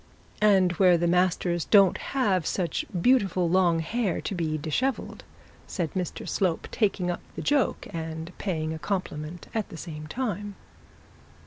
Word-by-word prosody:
'And 195 -4 +5
where 180 -3 +6
the 170 - 0
masters 175 -1 +1
don't 195 -4 +5
have 200 - 0
such 180 -3 -1
beautiful 195 -5 +3
long 175 -2 +3
hair 200 +2 -1
to - - -4
be 160 -4 -1
dishevelled,' 205 - -2 0.4
said 170 -5 -3
Mr 180 -3 -4
Slope, 180 -4 0
taking 195 -5 +1
up 175 - -5
the - - -5
joke 290 -3 +1
and 160 +1 -5
paying 160 -5 -2
a 160 - -6
compliment 170 -2 -4
at 220 -2 -2
the 165 - -9
same 155 -3 -7
time. 205 -1 -3
180 Hz, 145 wpm, -27 LUFS, 165-200 Hz, 0.4 s, where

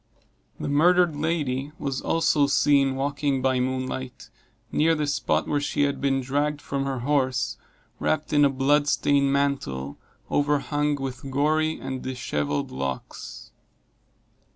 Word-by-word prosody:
The - - -3
murdered 170 +3 +4
lady 150 -3 -1
was 135 -2 -3
also 160 -3 +2
seen 140 -1 +3
walking 140 0 -1
by 130 0 +1
moonlight, 130 0 -4 0.4
near 165 +2 +3
the 150 -1 -1
spot 145 - 0
where 145 -1 0
she 145 - 0
had 140 0 -1
been 135 -1 +1
dragged 145 +3 -1
from 140 -1 -3
her 135 -3 -3
horse, 130 -2 0 0.4
wrapped 155 0 -1
in 145 0 +5
a 140 - +5
blood 140 +2 +2
stained 140 -1 +2
mantle, 135 - -1 0.3
overhung 145 0 +1
with 135 -1 -6
gory 155 +3 +1
and 130 -1 -5
dishevelled 75 - -2
locks. 65 0 -6
140 Hz, 130 wpm, -25 LUFS, 130-150 Hz, 0.4 s, in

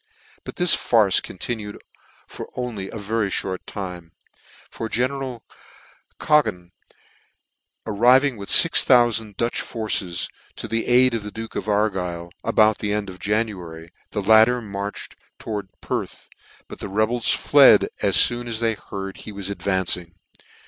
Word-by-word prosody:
But - - -8
this 180 -2 +3
farce 105 -6 +3
continued 105 +1 -6 0.8
only 115 -6 -5
for - - -10
a - - -5
very 105 0 -1
fhort 95 -1 -2
time; 90 -4 -7 0.6
for 110 - -6
general 130 +1 -2 0.8
Cadogan 105 -13 +1 1.1
arriving 125 +5 +3
with 100 -2 -8
fix 165 - +7
thou 120 -2 +5
fand 110 -3 -3
Dutch 120 0 -1
forces 100 -6 -2 0.3
to - - -6
the 115 +1 -2
aid 125 0 +4
of 115 - -2
the 105 - -7
duke 110 +1 -9
of - - -4
Argyle, 90 -5 -1
about 110 0 +3
the 105 - -2
end 105 -2 -2
of 90 - -13
January, 90 -6 -3 0.2
the 105 - -4
latter 110 +4 +5
marched 100 -2 -7 0.2
to - - -11
wards 105 -3 -4
Perth; - - -5 0.4
but - - -10
the - - -6
rebels 110 +4 0
fled, - - +5
as - - +3
foon 120 0 -5
as 115 -2 -2
they 115 -1 +1
heard 95 -2 -8
he 110 - -9
was 100 -1 -6
advancing. 95 -3 -2
105 Hz, 150 wpm, -22 LUFS, 95-115 Hz, 1.1 s, fix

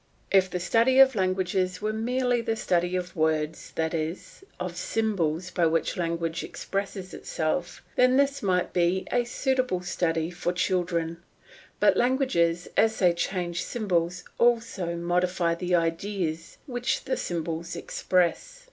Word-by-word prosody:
If 190 -1 +4
the 180 - -3
study 230 +8 +3
of 265 0 +8
languages 185 -2 0
were 215 +1 -1
merely 245 +2 0
the 225 -1 -1
study 180 -3 0
of 180 -1 -3
words, 155 -1 -1
that 160 0 -1
is, 165 - -4 0.2
of 180 0 -3
the 170 - -13
symbols 185 -6 -1
by 170 -2 +2
which 165 0 0
language 170 -1 -2
expresses 195 -1 -4
itself, 165 +2 -3
then 255 +1 +4
this 280 0 +2
might 180 -3 0
be 180 +2 +1
a 245 -1 +2
suitable 255 -7 0
study 165 -2 -1
for 175 0 -2
children; 175 -2 0 0.6
but - - +4
languages, 205 -10 +2
as 220 0 +3
they 180 -3 +4
change 175 0 -2
the - - -5
symbols, 180 -6 -1 0.2
also 230 -7 +1
modify 175 0 +1
the 180 +1 0
ideas 165 -1 -2
which 250 -2 -2
the - - -1
symbols 170 - -3
express. 185 - 0
180 Hz, 145 wpm, -27 LUFS, 170-220 Hz, 0.6 s, of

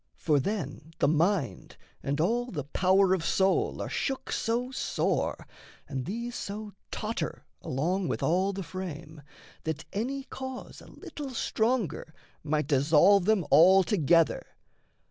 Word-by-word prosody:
For 150 -3 +2
then 155 -2 -4
the 140 - +2
mind 160 - 0 0.2
And 140 +2 -2
all 235 +9 +1
the 150 - -4
power 190 +6 +3
of 185 -3 0
soul 190 +3 +1
are - - -4
shook 270 -1 -3
so 240 +3 -1
sore, 265 - -1 0.4
And 135 -3 -4
these 235 - -4
so 210 -1 -6 0.2
totter - - -4 0.2
along 175 +8 -1
with - - -2
all 185 +4 +2
the 195 0 -5
frame, 165 -3 -7 0.4
That 160 -1 -3
any 265 +7 -2
cause 260 -1 -8
a - - -14
little 290 -2 -8
stronger 220 - -1 0.3
might 150 0 0
Dissolve 155 +8 +4
them 210 -5 +2
altogether. 170 - +5
185 Hz, 130 wpm, -28 LUFS, 155-215 Hz, 0.4 s, altogether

